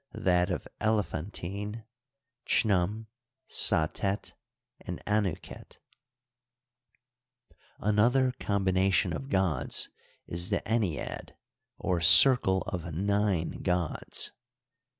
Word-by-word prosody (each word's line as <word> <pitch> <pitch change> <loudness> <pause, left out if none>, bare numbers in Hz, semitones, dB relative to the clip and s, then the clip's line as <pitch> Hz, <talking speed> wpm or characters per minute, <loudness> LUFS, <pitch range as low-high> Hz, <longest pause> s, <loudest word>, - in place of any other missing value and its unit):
that 90 0 +2
of 90 - -4
Elephantine: 105 +1 -3 0.6
Chnum, 105 +1 +1 0.4
Satet, 95 +3 +1 0.5
and - - -7
Anuket, 105 -5 -3 2.0
Another 120 +5 +2
combination 95 -2 +1
of 135 - -6
gods 95 - 0 0.3
is 85 +2 -1
the - - 0
ennead^ 100 - -3 0.4
or 90 -2 -1
circle 95 -1 +7
of 85 -4 -5
nine 100 -2 -1
gods. 90 -4 -2
95 Hz, 75 wpm, -29 LUFS, 90-105 Hz, 2.0 s, circle